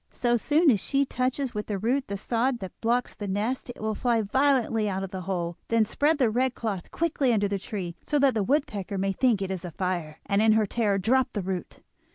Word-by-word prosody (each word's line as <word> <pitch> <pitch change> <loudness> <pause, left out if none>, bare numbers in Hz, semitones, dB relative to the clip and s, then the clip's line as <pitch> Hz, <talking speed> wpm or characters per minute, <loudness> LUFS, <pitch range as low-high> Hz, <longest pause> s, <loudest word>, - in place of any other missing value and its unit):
So 240 -1 +1
soon 300 +6 +4
as 210 - +2
she 275 +7 +1
touches 260 0 -1
with 210 -1 -4
the 205 - -2
root 250 +7 0
the 200 - -3
sod 240 +5 0
that 190 -4 -7
blocks 240 +2 +1
the 205 - -6
nest, 215 +7 -2
it 245 - -8
will 220 0 -1
fly 235 0 +1
violently 230 -2 +2
out 190 0 -2
of 190 - -6
the 190 - -5
hole. 175 -2 -2
Then 230 -1 +3
spread 295 +8 +1
the 250 -6 +2
red 250 +2 +1
cloth 200 -6 -4
quickly 295 -6 0
under 205 -3 +2
the 200 0 -2
tree, 190 -5 -5
so 295 - -1
that 275 -2 +4
the 220 - 0
woodpecker 210 -5 -1
may 195 +1 0
think 215 -1 +2
it 190 - -3
is 185 -3 -4
a 175 - -5
fire, 170 -3 -3
and 200 0 +2
in 220 0 +5
her 220 -1 +3
terror 205 -1 0
drop 250 +7 +2
the 205 - -2
root. 185 -1 -5
220 Hz, 235 wpm, -27 LUFS, 195-255 Hz, -, in